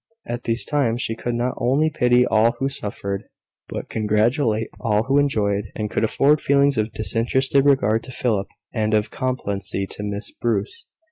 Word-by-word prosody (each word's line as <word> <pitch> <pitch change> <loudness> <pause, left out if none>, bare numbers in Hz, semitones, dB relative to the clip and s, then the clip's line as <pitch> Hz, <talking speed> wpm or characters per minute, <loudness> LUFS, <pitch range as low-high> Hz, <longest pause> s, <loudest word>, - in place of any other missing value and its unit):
At 120 +1 -5
these 115 0 +1
times 130 -6 0
she 115 - -1
could 120 +1 -3
not 120 +2 -1
only 135 +6 +2
pity 125 -4 +3
all 115 +1 +3
who 135 +3 -2
suffered, 100 -5 -4 0.5
but - - -5
congratulate 110 +2 +1
all 105 -2 +1
who 135 +3 +2
enjoyed, 105 -8 +1
and 105 -1 -3
could - - 0
afford 145 +7 +3
feelings 140 0 +3
of 110 +1 -1
disinterested 130 +5 +2
regard 115 -6 +3
to 130 - -9
Philip, 110 -6 -1 0.3
and 110 -1 +1
of 105 0 0
complacency 100 -7 -2
to - - -6
Miss 100 0 -4
Bruce. 370 - -3
115 Hz, 165 wpm, -22 LUFS, 105-135 Hz, 0.5 s, pity